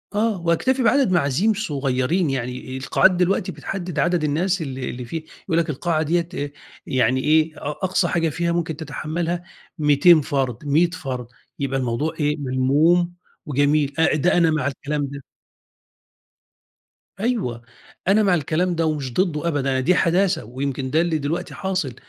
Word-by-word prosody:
آه 210 -3 +1
واكتفي 250 +11 +1
بعدد 260 -2 +3
معازيم 175 +6 +2
صغيّرين، 145 - 0
يعني 130 0 -4
القاعات 135 +7 +3
دلوقتي 180 +1 +1
بتحدد 175 +3 -5
عدد 175 -2 +1
الناس 175 +5 0
اللي 130 -3 -4
اللي 125 0 -6
فيه، 160 +6 -5 0.2
يقول 165 -3 -1
لك 170 -2 +1
القاعة 155 +2 0
ديّة 170 +2 0 0.6
يعني 130 -1 +1
إيه 155 +1 +2
أ - - -9
أقصى 185 +3 0
حاجة 165 -1 +1
فيها 170 +3 -1
ممكن 165 -2 -1
تتحملها 170 +2 -3 0.4
200 150 +3 +6
فرد، 135 -3 -2
100 160 +4 +3
فرد، 130 -9 -5 0.3
يبقى 135 -1 -1
الموضوع 125 +5 -1
إيه 150 0 +1
ملموم 145 +6 +2 0.3
وجميل، 145 0 +1
أ 160 - +4
ده 175 +4 +2
أنا 165 -2 +4
مع 150 -3 0
الكلام 145 +1 -2
ده. 140 0 -8 2.0
أيوه 205 - -1 0.5
أنا 205 +3 +4
مع 190 -3 +4
الكلام 170 +3 0
ده 165 - +1
ومش 145 -6 -2
ضده 170 -2 0
أبدًا، 135 -4 0
دي 170 +8 +3
حداثة 185 +2 +2
ويمكن 130 +2 -3
ده 160 - +3
اللي 170 -2 0
دلوقتي 165 +5 -3
حاصل، 185 - -2
155 Hz, 150 wpm, -22 LUFS, 140-175 Hz, 2.0 s, 200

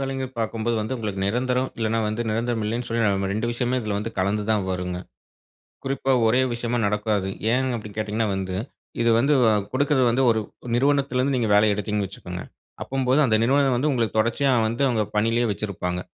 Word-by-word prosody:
வேலைங்கறது, 135 -1 -2
பார்க்கும்போது 115 +1 -1
வந்து, 110 +4 -3
உங்களுக்கு 105 -4 -4
நிரந்தரம். 125 +4 0
இல்லைனா 115 0 0
வந்து, 110 +2 -2
நிரந்தரம் 115 0 -1
இல்லைன்னு 115 +3 -2
சொல்லி, 115 0 0
நம்ம 100 -2 +1
2 110 +3 -1
விஷயமே 120 +1 -1
இதுல 105 -3 -2
வந்து, 110 +2 -4
கலந்து 100 +3 0
தான் 105 -3 +2
வருங்க. 90 -1 -3 0.9
குறிப்பா, 135 0 0
ஒரே 125 +4 +4
விஷயமா 120 0 -2
நடக்காது. 105 -1 0 0.2
ஏன் 130 +1 +1
அப்டின்னு 105 -2 -9
கேட்டீங்கன்னா 110 +1 -1
வந்து, 95 -1 -3 0.5
இது 115 - +3
வந்து, 140 +5 +2 0.2
அ - - +3 0.2
குடுக்கறது 135 0 +2
வந்து, 130 +3 +2
ஒரு 110 -1 -1 0.3
நிறுவனத்திலிருந்து 135 0 +1
நீங்க 115 -4 0
வேலை 105 +1 +5
எடுத்தீங்கன்னு 105 -1 -2
வச்சுக்கங்க, 90 -2 -7 0.4
அப்படீங்கம்போது 135 +2 +1
அந்த 110 -3 +3
நிறுவன 135 +2 +3
வந்து, 145 +5 +1
உங்களுக்கு 115 -4 0
தொடர்ச்சியா 130 +5 +1 0.2
வந்து, 120 +5 0
அவுங்க 110 -4 +1
பணியிலயே 115 +2 +2
வச்சிருப்பாங்க. 90 -3 -3
115 Hz, 175 wpm, -24 LUFS, 105-130 Hz, 0.9 s, வேலை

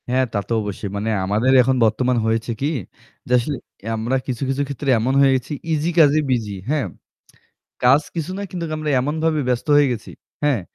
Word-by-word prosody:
হ্যাঁ, 130 +1 +2
তা - - 0
তো - - 0
অবশ্যই। 105 0 -5
মানে 105 +2 -2 0.2
আমাদের 110 +7 +2
এখন 130 +2 +2
বর্তমান 125 +3 +1
হয়েছে 115 +1 0
কি? 140 - +1 0.6
যে - - -7
আসলে 140 +4 -3 0.4
আমরা 115 +4 -1
কিছু, 125 -4 -3
কিছু 135 +1 0
ক্ষেত্রে 140 0 -4
এমন 125 +4 0
হয়ে 135 -1 +5
গেছি 130 +3 -3 0.2
easy 155 +1 +1
কাজে 150 -1 +6
busy, 115 -5 0 0.2
হ্যাঁ? 150 -4 +1 1.0
কাজ 135 +5 +6
কিছু 165 +1 -3
না - - -4
কিন্তু 175 -2 -4
আমরা 155 -1 -2
এমনভাবে 155 +3 0
ব্যস্ত 125 -1 -1
হয়ে 145 -1 +5
গেছি। 110 -3 -7 0.3
হ্যাঁ? 140 -7 +2
130 Hz, 185 wpm, -21 LUFS, 115-145 Hz, 1.0 s, কাজে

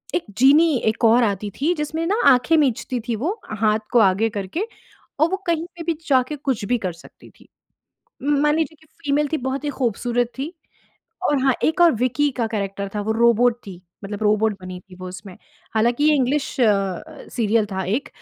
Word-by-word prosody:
एक 350 - -1
जीनी 290 +5 +5
एक 220 +1 0
और 235 +2 +5
आती 205 -1 -1
थी 325 +5 +3
जिसमें 315 +2 -2
ना 400 - +1
आँखें 255 +6 +4
मीचती 255 -3 0
थी 235 - 0
वो 340 - -3 0.2
हाथ 215 0 +2
को 245 - +5
आगे 205 +2 +3
करके 205 - -3 0.5
और 315 +2 +4
वो 385 - 0
कहीं 335 -1 0
पे 335 - -6
भी 335 0 0
जाके 260 +1 +2
कुछ 270 -7 -2
भी 245 +3 +1
कर 180 - -4
सकती 170 - -16
थी। - - -22 0.8
म 285 0 +1
मान 300 0 +3
लीजिए 320 0 -1
कि 315 - -22 0.2
फीमेल 290 +1 +1
थी, - - +2
बहुत 265 +1 -3
ही - - -1
खूबसूरत 245 -1 -1
थी। 290 +5 -4 0.8
और 290 - +2
हाँ, 265 -1 +3
एक 320 +3 +1
और 340 -2 +7
विक्की 255 +5 +1
का 235 -3 0
कैरेक्टर 200 -2 -3
था 210 - -1
वो 220 +2 -1
रोबोट 235 +1 +3
थी, 185 -2 -10 0.2
मतलब 205 +1 -5
रोबोट 215 +1 +2
बनी 185 0 -7
थी 185 0 -17
वो 185 0 -8
उसमें। 180 +1 -10 0.4
हालाँकि 240 +5 +2
ये 305 0 +5
इंग्लिश 275 +2 -1
अ, - - +5 0.7
सीरियल 225 -2 +1
था 190 0 -2
एक 225 +9 -2
245 Hz, 200 wpm, -22 LUFS, 215-295 Hz, 0.8 s, और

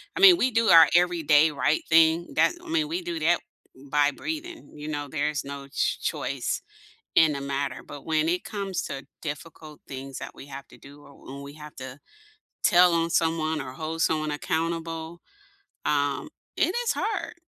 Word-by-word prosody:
I - - -3
mean, 380 -2 +9
we 260 -6 +2
do 230 0 +2
our 165 -2 +9
everyday 160 -3 +4
right 150 +1 +1
thing, 160 +1 +4
that - - +4
I 350 - -11
mean, 320 -2 +1
we 340 +4 -3
do 345 -2 -4
that - - +3 0.5
by 145 0 +3
breathing, 320 - -6
you 150 0 -8
know? 145 -1 -3
There's 150 -1 -1
no 140 0 -8
ch - - -1
choice - - -2 0.6
in 160 -2 +6
the 140 - -4
matter, 140 0 -3
but 145 - -10
when 160 0 +1
it 180 +1 0
comes 195 -3 -3
to 135 0 -6 0.2
difficult 155 0 -8
things 135 0 -7
that - - -7
we - - -11
have 140 0 -9
to - - -16
do, 145 +1 -15
or 140 0 -16
when 140 +1 -8
we 140 +1 -10
have 150 -1 -11
to 130 +1 -8 0.7
tell 175 0 +6
on 165 0 +1
someone 160 -2 +1
or 130 -2 -6
hold 160 +3 -5
someone 155 -1 +1
accountable, 165 +2 -3 0.7
um, - - 0 0.3
it 365 - +1
is 475 - +2
hard. 430 -1 -2
160 Hz, 180 wpm, -26 LUFS, 145-175 Hz, 0.7 s, mean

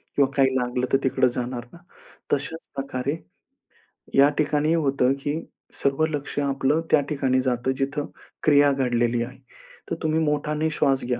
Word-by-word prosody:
किंवा 140 -2 +3
काही 130 -1 +3
लागलं 125 0 -1
तर - - +7
तिकडे 130 -1 +3
जाणार 120 0 -4
ना? - - -12 0.6
तशाच 160 +3 -1 0.2
प्रकारे 135 +1 -2 1.0
या 140 +1 +7
ठिकाणी 150 +1 +2
होतं, 135 -5 +2
की 145 +3 -3 0.4
सर्व 140 +3 +2
लक्ष 145 -2 -4
आपलं 140 +2 +1
त्या 150 - +6
ठिकाणी 135 -3 +1
जातं 125 0 0
जिथे 145 +2 -1 0.4
क्रिया 145 -1 +5
घडलेली 120 -3 +1
आहे. 125 +2 -9 0.5
तर - - -1
तुम्ही 155 0 +1
मोठाने 150 0 0
श्वास 135 -4 +1
घ्या 120 -1 -1
135 Hz, 150 wpm, -24 LUFS, 130-150 Hz, 1.0 s, तर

